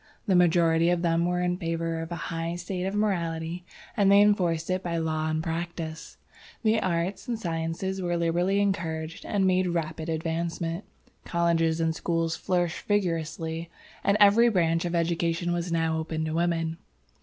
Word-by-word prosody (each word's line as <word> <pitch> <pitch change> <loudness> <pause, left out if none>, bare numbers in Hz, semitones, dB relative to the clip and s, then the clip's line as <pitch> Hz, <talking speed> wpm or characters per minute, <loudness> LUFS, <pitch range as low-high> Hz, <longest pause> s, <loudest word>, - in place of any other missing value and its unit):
The 200 - +2
majority 170 -1 +4
of 175 0 +1
them 170 0 +2
were 180 0 0
in 180 0 0
favor 165 -1 -2
of 165 +1 -7
a - - -2
high 165 0 -3
state 180 +1 -4
of 195 - -3
morality, 170 -4 -1 0.3
and 200 -3 +4
they 200 - +7
enforced 180 -5 +2
it 185 0 0
by 170 -2 -2
law 160 -1 -1
and 155 0 -1
practice. 165 -1 -5 0.5
The 220 0 +3
arts 185 +5 -1
and 240 -2 -1
sciences 170 +1 -3
were 175 -1 0
liberally 175 +4 +1
encouraged 165 -5 -2
and 200 -2 +1
made 185 0 +3
rapid 160 -1 -3
advancement. 165 +2 -2 0.4
Colleges 170 -1 +1
and 165 0 +1
schools 165 -1 -1
flourished 175 -1 -1
vigorously, 165 -4 -1 0.3
and 200 +1 +3
every 210 +4 +6
branch 165 -4 +1
of 175 0 -1
education 170 +1 0
was 175 0 -2
now 165 -1 +1
open 160 0 -3
to 155 - -3
women. 165 -1 0
170 Hz, 165 wpm, -27 LUFS, 165-180 Hz, 0.5 s, they